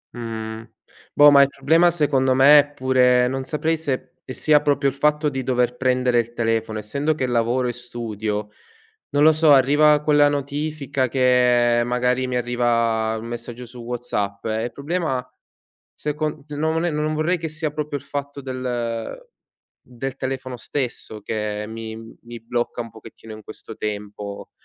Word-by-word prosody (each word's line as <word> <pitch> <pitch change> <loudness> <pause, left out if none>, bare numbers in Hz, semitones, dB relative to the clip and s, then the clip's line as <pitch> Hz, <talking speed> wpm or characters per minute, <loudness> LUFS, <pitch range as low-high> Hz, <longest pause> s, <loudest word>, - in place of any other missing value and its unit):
Mh, 110 -1 -5 0.5
boh, 145 0 +8
ma 140 - +7
il 140 - +6
problema 160 +6 +3
secondo 140 -6 +1
me 140 +3 +8
è 145 - +2
pure 125 -1 +3
non 130 +1 -3
saprei 160 +3 -1
se 140 -5 -4
sia 150 +3 +2
proprio 145 -1 +1
il 135 - 0
fatto 150 +2 +1
di 135 -2 -2
dover 125 -1 0
prendere 125 -1 +2
il 120 0 -3
telefono. 115 -2 -1
Essendo 140 +8 -1
che 130 - -1
lavoro 120 +1 +1
e 120 - -2
studio, 110 -3 -5 0.6
non 145 0 +2
lo 160 +1 +7
so, 155 -1 +4
arriva 145 +3 +5
quella 145 -1 +4
notifica 145 -1 -2
che 125 -2 +3
magari 125 +1 0
mi 125 - -3
arriva 115 -2 0
un 110 - -8
messaggio 120 +1 -7
su 120 +1 -13
WhatsApp 115 -4 -4
e 110 0 -1
il 120 - -5
problema 140 -2 -2 0.7
se 150 - -3
con 155 -1 -3
no 150 -1 -7
non 160 +1 -1
è 175 - +1
non 150 +1 -1
vorrei 155 +4 +1
che 165 -1 -4
sia 155 0 -3
proprio 150 -1 -3
il 140 - -12
fatto 140 0 -5
del 125 - -4 0.6
del 130 +2 -6
telefono 130 -1 -4
stesso 120 -5 -4
che 105 0 -3
mi 110 0 -7 0.3
mi 120 -1 -10
blocca 120 +1 -3
un 115 - -11
pochettino 110 0 -13
in 110 - -11
questo 110 +1 -11
tempo, 105 -1 -6
125 Hz, 165 wpm, -22 LUFS, 115-145 Hz, 0.7 s, boh